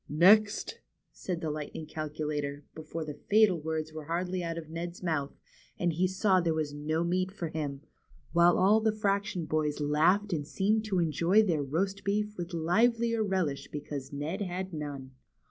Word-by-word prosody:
Next! 205 - +4 0.2
'' - - -51
said 175 -3 -4
the 160 - -2
Lightning 150 +1 -5
Calculator, 150 -2 -4
before 160 +1 -6
the 150 - -5 0.2
fatal 210 -4 +5
words 155 0 -3
were 155 -1 -7
hardly 180 +3 -2
out 165 -1 -3
of 165 -2 -6
Ned's 170 +2 -6
mouth, 155 -5 -2 0.4
and 175 -1 0
he 180 +4 +2
saw 190 0 +2
there 165 -2 0
was 155 -2 -2
no 155 +3 -1
meat 185 +2 0
for 180 -5 -5
him, 145 -3 -4 0.5
while 170 +1 +5
all 200 +4 +5
the 220 0 +3
fraction 200 -4 0
boys 155 -1 -1
laughed 165 +7 +2
and 145 -3 -2
seemed 215 +5 +1
to 200 -3 -1
enjoy 170 +5 +3
their 170 -7 +1
roast 190 +8 -2
beef 210 +1 -1
with 175 -1 -5
livelier 230 +7 +2
relish 185 -8 -1
because 145 -2 -6
Ned 150 +8 -4
had 185 -1 -4
none. 145 -4 -6
170 Hz, 175 wpm, -30 LUFS, 155-195 Hz, 0.5 s, fatal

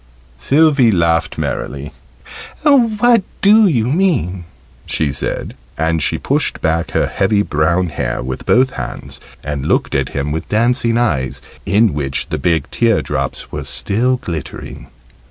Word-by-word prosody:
Sylvie 140 - +4
laughed 85 -4 +1
merrily. 70 +1 -4 0.7
"What 240 -5 +4 0.2
do 210 +1 +6
you 120 -11 +1
mean?" 125 - 0 0.4
she 75 -3 -1
said. 70 - -3 0.2
And 80 0 0
she - - 0
pushed - - 0
back 80 +1 0
her - - +1
heavy 100 +1 +1
brown 85 +2 +1
hair 75 - -3
with 65 0 -6
both 130 +2 +4
hands, - - -7 0.2
and 70 -1 -3
looked - - +1
at - - 0
him 70 +1 -3
with 80 +1 -4
dancing 115 +1 +2
eyes 65 - 0 0.3
in 105 0 +3
which 70 -2 -3
the - - -2
big 85 -3 0
teardrops 115 -3 -1
were - - -4
still 125 +6 0
glittering. 85 -9 -7
100 Hz, 135 wpm, -17 LUFS, 80-130 Hz, 0.7 s, do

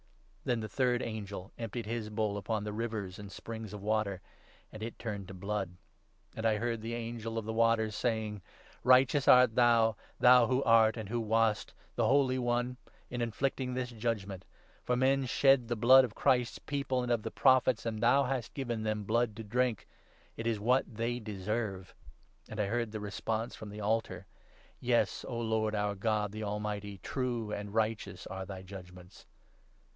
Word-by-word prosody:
Then 120 -2 0
the 110 - -4
third 125 0 +1
angel 100 -4 -6
emptied 115 0 -4
his 110 -1 -3
bowl 105 -1 -1
upon 105 +1 -2
the 105 0 -4
rivers 105 -4 -4
and 105 - -8
4 95 - -11
springs 110 -2 -7
of 105 -1 -8
water; 105 -3 0 0.5
and 110 - -9
it 115 +1 -5
turned 100 -4 -5
to 95 - -9
blood. 95 -1 -3 0.6
And 110 - -5
I 110 -1 +2
heard 115 +1 -1
5 - - -12
the 115 +1 -4
Angel 115 -1 -5
of 110 - -2
the 110 - -3
Waters 110 -1 +2
saying 110 -4 -1
— - - -24
' - - -30
Righteous 130 +2 +5
art 125 -2 +7
thou, 115 -2 +4 0.2
thou 125 -1 +7
who 130 +1 +1
art 115 0 +5
and 110 -3 -6
who 120 +1 -1
wast, 110 -1 +1 0.2
the - - +2
Holy 130 -1 +3
One, 120 +1 0 0.3
in 120 -1 -3
inflicting 125 +2 -1
this 125 -1 -3
judge 115 -3 -2
ment; 95 -2 -8 0.4
for 125 - +1
men 135 +1 +2
shed 135 -1 +4
the 120 - -1
blood 130 +4 +7
of 120 -4 -4
Christ's 125 -2 +2
People 140 -3 -2
and 125 - -2
of 120 -2 +2
the 110 - -4
6 - - -21
Prophets, 130 -3 +4
and 110 -2 -3
thou 135 +4 +5
hast 125 -3 -3
given 120 -5 -2
them 110 -1 -1
blood 115 +1 +1
to 115 - -7
drink. 120 +1 0 0.5
It 115 - -4
is 115 -3 0
what 125 +1 +1
they 120 +2 -1
deserve.' 105 -2 -4 0.6
And 110 - -7
I 105 - +2
heard 115 +2 -1
the 110 - -4
response 110 +3 -3
from 110 - -8
the 105 - -9
7 105 - -4
altar 115 +2 -1 0.2
— - - -30
' - - -32
Yes, - - +1
O 115 - -3
Lord, 110 -2 0
our 105 0 0
God, 105 0 0
the 110 +1 -5
Almighty, 105 -1 -3
true 120 -5 -2
and 105 0 -5
righteous 110 0 -1
are 95 0 -6
thy 95 -2 -7
judgements.' 90 -1 -12
110 Hz, 200 wpm, -32 LUFS, 105-120 Hz, 0.6 s, art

